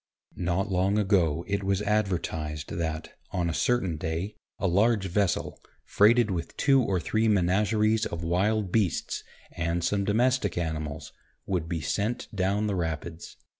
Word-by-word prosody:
Not 90 Hz, +3 st, -1 dB
long 95 Hz, +3 st, +2 dB
ago 90 Hz, -6 st, +2 dB
it 100 Hz, 0 st, -1 dB
was 100 Hz, +1 st, 0 dB
advertised 85 Hz, -8 st, -1 dB
that, 80 Hz, -1 st, -3 dB, 0.2 s
on 85 Hz, -2 st, -1 dB
a -, -, -4 dB
certain 95 Hz, -6 st, +1 dB
day, 80 Hz, +7 st, -3 dB, 0.2 s
a 100 Hz, -, -3 dB
large 100 Hz, +3 st, +3 dB
vessel, 95 Hz, -2 st, -1 dB, 0.2 s
freighted 110 Hz, +1 st, +4 dB
with 85 Hz, -3 st, -4 dB
two 135 Hz, -2 st, +4 dB
or 95 Hz, -6 st, 0 dB
three 110 Hz, +7 st, +1 dB
menageries 105 Hz, +3 st, +2 dB
of 85 Hz, 0 st, -5 dB
wild 95 Hz, +4 st, +1 dB
beasts, 100 Hz, -5 st, 0 dB, 0.3 s
and 85 Hz, +1 st, -2 dB
some 100 Hz, +2 st, +1 dB
domestic 110 Hz, -1 st, +1 dB
animals, 80 Hz, -3 st, -4 dB, 0.3 s
would 85 Hz, -4 st, -2 dB
be 85 Hz, -2 st, -2 dB
sent 105 Hz, +9 st, -2 dB
down 100 Hz, +2 st, +1 dB
the 105 Hz, -, 0 dB
Rapids. 80 Hz, -1 st, -4 dB
95 Hz, 145 wpm, -27 LUFS, 85-105 Hz, 0.3 s, freighted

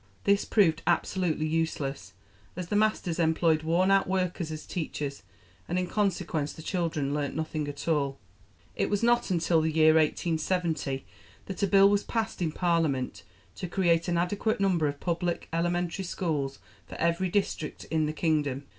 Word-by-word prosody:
This 200 Hz, 0 st, +3 dB
proved 165 Hz, -7 st, +3 dB
absolutely 175 Hz, -5 st, +1 dB
useless, 145 Hz, -, -2 dB, 0.4 s
as 180 Hz, -1 st, -5 dB
the -, -, 0 dB
masters 205 Hz, -5 st, +1 dB
employed 160 Hz, -1 st, +3 dB
worn 170 Hz, +4 st, +2 dB
out 195 Hz, 0 st, +4 dB
workers 180 Hz, -3 st, -1 dB
as 155 Hz, 0 st, -6 dB
teachers, 150 Hz, -4 st, -4 dB, 0.5 s
and 175 Hz, -, -1 dB
in 185 Hz, -, +1 dB
consequence 175 Hz, -6 st, -1 dB
the 160 Hz, -, -11 dB
children 165 Hz, -6 st, -1 dB
learnt 145 Hz, -1 st, -2 dB
nothing 155 Hz, -1 st, -2 dB
at 145 Hz, +1 st, -7 dB
all. 140 Hz, -4 st, +1 dB, 0.6 s
It -, -, 0 dB
was 205 Hz, +1 st, 0 dB
not 240 Hz, -1 st, +3 dB
until 165 Hz, -2 st, +2 dB
the 160 Hz, -, +1 dB
year 155 Hz, 0 st, +5 dB
1870 160 Hz, -2 st, 0 dB, 0.4 s
that 195 Hz, -, -6 dB
a 200 Hz, -, +3 dB
Bill 195 Hz, 0 st, +6 dB
was 205 Hz, 0 st, +2 dB
passed 225 Hz, -4 st, -2 dB
in 165 Hz, -3 st, 0 dB
Parliament 155 Hz, -, 0 dB, 0.3 s
to 180 Hz, -, -5 dB
create 170 Hz, -2 st, +2 dB
an 175 Hz, -1 st, +1 dB
adequate 200 Hz, +5 st, 0 dB
number 180 Hz, -6 st, +2 dB
of 145 Hz, 0 st, -4 dB
public 175 Hz, 0 st, -2 dB
elementary 175 Hz, +2 st, -1 dB
schools 150 Hz, -7 st, -2 dB, 0.3 s
for -, -, -9 dB
every 170 Hz, +2 st, +1 dB
district 175 Hz, -5 st, -2 dB
in 160 Hz, -1 st, +2 dB
the 155 Hz, -, -2 dB
kingdom. 150 Hz, -4 st, 0 dB
165 Hz, 165 wpm, -28 LUFS, 155-185 Hz, 0.6 s, Bill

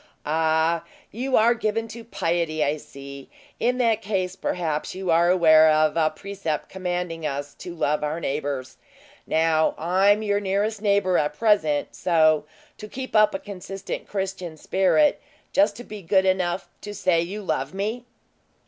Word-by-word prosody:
"Ah! 160 Hz, +1 st, +1 dB, 0.3 s
you 255 Hz, +4 st, 0 dB
are 230 Hz, +2 st, +5 dB
given 225 Hz, -1 st, -2 dB
to 230 Hz, +1 st, -9 dB
piety, 165 Hz, -7 st, -1 dB
I 150 Hz, +2 st, 0 dB
see. 140 Hz, -1 st, -11 dB, 0.3 s
In 250 Hz, +2 st, +1 dB
that 230 Hz, -3 st, +2 dB
case, 190 Hz, -3 st, -2 dB
perhaps 160 Hz, -3 st, -3 dB
you 190 Hz, -2 st, -2 dB
are 170 Hz, +1 st, +4 dB
aware 160 Hz, -3 st, +6 dB
of 155 Hz, 0 st, +3 dB
a 160 Hz, -2 st, +3 dB
precept 185 Hz, -2 st, -5 dB
commanding 180 Hz, -3 st, -4 dB
us 145 Hz, -1 st, -4 dB
to 175 Hz, -1 st, -8 dB
love 150 Hz, -2 st, 0 dB
our 150 Hz, +2 st, -2 dB
neighbors. 140 Hz, -4 st, -3 dB, 0.5 s
Now, 160 Hz, 0 st, +2 dB
I'm 195 Hz, +6 st, +3 dB
your 205 Hz, -1 st, +1 dB
nearest 205 Hz, +2 st, -1 dB
neighbor 200 Hz, -3 st, +2 dB
at 150 Hz, 0 st, -2 dB
present; 160 Hz, -10 st, +2 dB
so, 155 Hz, -3 st, +3 dB, 0.3 s
to 210 Hz, -, -8 dB
keep 260 Hz, +2 st, -7 dB
up 215 Hz, -2 st, +5 dB
a -, -, -2 dB
consistent 195 Hz, 0 st, -7 dB
Christian 190 Hz, -4 st, -4 dB
spirit, 195 Hz, -, +2 dB, 0.3 s
just 290 Hz, -4 st, +1 dB
be 215 Hz, -1 st, -8 dB
good 190 Hz, +2 st, +2 dB
enough 185 Hz, -1 st, 0 dB
to 205 Hz, 0 st, -7 dB
say 185 Hz, -4 st, +2 dB
you 200 Hz, +5 st, -5 dB
love -, -, -2 dB
me!" 210 Hz, +5 st, -3 dB
180 Hz, 155 wpm, -24 LUFS, 155-205 Hz, 0.5 s, aware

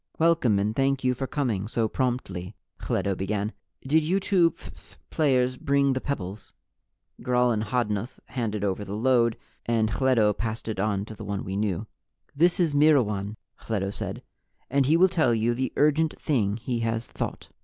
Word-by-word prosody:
"Welcome 160 Hz, -10 st, +3 dB
and 105 Hz, +2 st, 0 dB
thank 135 Hz, 0 st, +1 dB
you 125 Hz, 0 st, +3 dB
for 135 Hz, +2 st, -4 dB
coming 115 Hz, -10 st, -1 dB
so 115 Hz, 0 st, 0 dB
promptly," 105 Hz, -7 st, -3 dB, 0.2 s
Hledo 100 Hz, -, -1 dB
began. 100 Hz, +3 st, -2 dB, 0.3 s
"Did 155 Hz, +4 st, +3 dB
you 180 Hz, +5 st, +1 dB
two 185 Hz, -3 st, +3 dB
phph -, -, -15 dB, 0.2 s
players 130 Hz, -4 st, +2 dB
bring 140 Hz, 0 st, +2 dB
the 130 Hz, -, -2 dB
pebbles?" 105 Hz, -7 st, -5 dB, 0.7 s
Gral 125 Hz, 0 st, +2 dB
and 110 Hz, -2 st, 0 dB
Hodnuth 105 Hz, -1 st, -2 dB
handed 110 Hz, -5 st, -2 dB
over 100 Hz, 0 st, -1 dB
the 100 Hz, 0 st, -5 dB
load, 115 Hz, 0 st, +2 dB, 0.3 s
and 110 Hz, -2 st, +1 dB
Hledo 120 Hz, -5 st, +3 dB
passed 110 Hz, +2 st, -4 dB
it 110 Hz, -3 st, -3 dB
on 100 Hz, -1 st, 0 dB
to 110 Hz, -, -9 dB
the 110 Hz, -, -9 dB
one 100 Hz, -1 st, -3 dB
we 95 Hz, -, -4 dB
knew. 105 Hz, 0 st, -1 dB, 0.5 s
"This 175 Hz, +5 st, +3 dB
is 165 Hz, -4 st, +2 dB
Myrwan," 115 Hz, -9 st, +3 dB, 0.3 s
Hledo 100 Hz, -3 st, -1 dB
said, -, -, -5 dB, 0.5 s
"and 135 Hz, -1 st, +3 dB
he 160 Hz, +3 st, +4 dB
will 185 Hz, +2 st, +6 dB
tell 160 Hz, -10 st, +2 dB
you 115 Hz, +2 st, +1 dB
the 130 Hz, +2 st, -2 dB
urgent 150 Hz, +2 st, +2 dB
thing 105 Hz, -8 st, 0 dB
he 120 Hz, +1 st, -3 dB
has 115 Hz, 0 st, -1 dB
Thought." -, -, -5 dB
120 Hz, 175 wpm, -26 LUFS, 105-140 Hz, 0.7 s, will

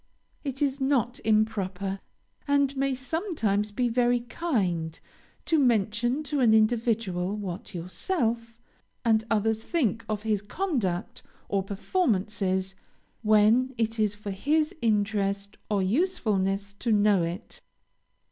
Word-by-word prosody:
It 275 Hz, -1 st, -2 dB
is 275 Hz, -1 st, -1 dB
not 255 Hz, -3 st, +1 dB
improper, 200 Hz, -3 st, 0 dB, 0.5 s
and 280 Hz, -1 st, +2 dB
may 270 Hz, 0 st, 0 dB
sometimes 255 Hz, -, -1 dB
be 245 Hz, +4 st, 0 dB
very 240 Hz, 0 st, +2 dB
kind 190 Hz, -, -2 dB, 0.5 s
to 320 Hz, -, +3 dB
mention 240 Hz, +2 st, +2 dB
to 295 Hz, -1 st, -2 dB
an 230 Hz, -4 st, +5 dB
individual 215 Hz, -4 st, +1 dB
what 190 Hz, -4 st, -6 dB
yourself 230 Hz, -, -2 dB, 0.5 s
and 220 Hz, -1 st, +4 dB
others 220 Hz, 0 st, +1 dB
think 230 Hz, -, 0 dB
of 215 Hz, -1 st, -2 dB
his 215 Hz, -3 st, 0 dB
conduct 210 Hz, -, -2 dB, 0.3 s
or 200 Hz, -1 st, +1 dB
performances, 195 Hz, -, -1 dB, 0.5 s
when 220 Hz, +4 st, +4 dB
it 225 Hz, 0 st, -1 dB
is 210 Hz, -1 st, +1 dB
for 205 Hz, -1 st, -6 dB
his 305 Hz, -, +1 dB
interest 200 Hz, -2 st, 0 dB
or 205 Hz, -2 st, +1 dB
usefulness 200 Hz, -, 0 dB
to 235 Hz, -, 0 dB
know 205 Hz, -3 st, +4 dB
it. 170 Hz, +5 st, -5 dB
220 Hz, 120 wpm, -27 LUFS, 200-255 Hz, 0.5 s, an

